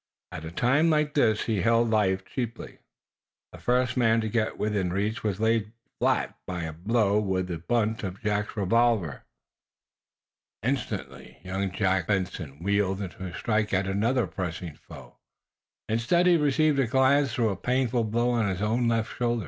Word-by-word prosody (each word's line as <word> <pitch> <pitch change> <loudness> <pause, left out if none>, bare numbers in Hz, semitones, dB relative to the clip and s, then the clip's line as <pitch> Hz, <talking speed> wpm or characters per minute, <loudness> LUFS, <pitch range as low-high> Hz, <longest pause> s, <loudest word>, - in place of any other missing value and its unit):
At 80 - -7
a - - -5
time 135 - +2
like 150 -2 +1
this 110 -7 +2
he 110 -5 -1
held 115 +1 +3
life 95 -3 +1
cheaply. 120 -3 -5 0.7
The - - -12
first 125 0 +1
man 115 -2 +3
to 110 - -2
get 110 0 -1
within 105 -4 -1
reach 105 +4 -2
was 105 -3 -1
laid 110 -1 +1 0.3
flat - - +1
by 90 -2 -3
a 80 -1 -4
blow 105 +4 +1
with 95 -3 -1
the 85 -3 -5
butt 110 +4 0
of 95 -1 -5
Jack's 105 +1 -1
revolver. 105 - +1 1.4
Instantly 130 +3 -4
young 95 +1 -2
Benson 95 -5 -1
wheeled, 100 -1 +1
to 95 -1 -8
strike 105 +1 0
at 95 +1 +1
another 110 +6 +1
pressing 90 -3 -5
foe. - - -14 0.7
Instead, 120 +11 +2
he 180 -1 +6
received 150 -1 +2
a 130 - +2
glancing 130 -1 +2
though 105 -3 +1
painful 125 +2 0
blow 120 +3 0
on 115 -4 +1
his 95 -1 -3
own 115 +3 +1
left 115 -1 0
shoulder. 120 -1 0
110 Hz, 155 wpm, -27 LUFS, 95-120 Hz, 1.4 s, he